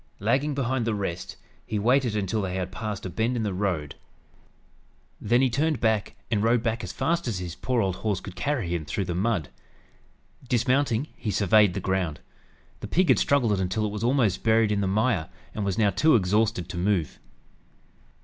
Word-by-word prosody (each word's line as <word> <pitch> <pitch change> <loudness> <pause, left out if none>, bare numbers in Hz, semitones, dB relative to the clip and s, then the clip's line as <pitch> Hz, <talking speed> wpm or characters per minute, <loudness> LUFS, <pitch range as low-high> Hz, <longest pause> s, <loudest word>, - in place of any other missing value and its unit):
Lagging 135 +8 +1
behind 130 -3 -1
the 110 - 0
rest, 95 -3 -4 0.3
he 110 - -3
waited 120 +1 +2
until 105 +1 -1
they 95 -2 -3
had 95 -1 -3
passed 105 -1 -5
a - - -3
bend 115 +6 0
in 115 - -1
the 105 -3 -1
road. 90 -7 -2 1.3
Then 120 +2 +3
he 130 - +3
turned 155 +3 +1 0.5
and 105 -3 +2
rode 115 +1 +3
back 115 -1 -1
as 95 - -5
fast 165 +8 -1
as 110 -5 -1
his 90 -2 -5
poor 125 +6 -1
old 95 -2 -1
horse 105 -3 -1
could 95 - -10
carry 135 -10 -1
him 85 -2 -2
through 95 +6 -3
the 90 - -3
mud. 95 - 0 1.0
Dismounting, 125 +1 +2
he 110 - -4
surveyed 105 -1 +4
the - - -1
ground. 95 -5 -1 0.6
The - - -6
pig 185 +1 +2
had - - +5
struggled 115 -9 +2
until 95 +4 -1
it 105 - -2
was 105 +1 -5
almost 120 -6 +2
buried 110 -1 +3
in 100 -1 +1
the 100 - 0
mire, 105 -3 +1 0.2
and 105 - -3
was 100 -2 -1
now 105 -3 +3
too 155 - +4
exhausted 105 -1 +1
to 90 - -6
move. 90 -5 0
105 Hz, 190 wpm, -26 LUFS, 95-120 Hz, 1.3 s, had